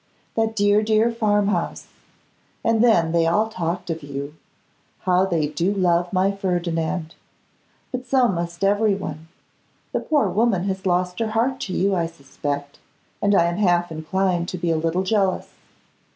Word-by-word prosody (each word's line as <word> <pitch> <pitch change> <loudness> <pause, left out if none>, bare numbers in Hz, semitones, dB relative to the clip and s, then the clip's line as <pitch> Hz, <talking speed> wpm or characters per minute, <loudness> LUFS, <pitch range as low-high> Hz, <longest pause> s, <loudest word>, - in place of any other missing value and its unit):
That 225 0 0
dear, 205 0 +4
dear 220 +2 +2
farm 205 -3 +1
house! 210 - -2 0.8
And 225 0 +3
then 170 -9 +4
they 165 -1 +2
all 210 +6 +2
talked 175 -4 -3
of 165 0 -4
you. 140 0 -6 0.7
How 185 +1 +2
they 165 -5 +1
do 170 +5 -1
love 175 -3 +1
my 190 +1 +2
Ferdinand! 175 -3 -2 0.8
But 255 0 -5
so 260 -2 +4
must 170 -2 -3
everyone. 195 -6 0 0.6
The - - 0
poor 300 -3 +1
woman 215 -4 +1
has 190 -1 -2
lost 180 0 0
her 225 -1 0
heart 240 +4 0
to 185 - -4
you, 195 +1 +1
I 170 -3 +1
suspect, 145 -2 -5 0.4
and 205 0 +3
I 170 - +5
am 170 +1 -1
half 175 -4 +2
inclined 175 +2 -1
to 185 - -4
be 170 -1 -1
a - - +2
little 165 +3 0
jealous. 195 -1 0
185 Hz, 160 wpm, -22 LUFS, 170-205 Hz, 0.8 s, I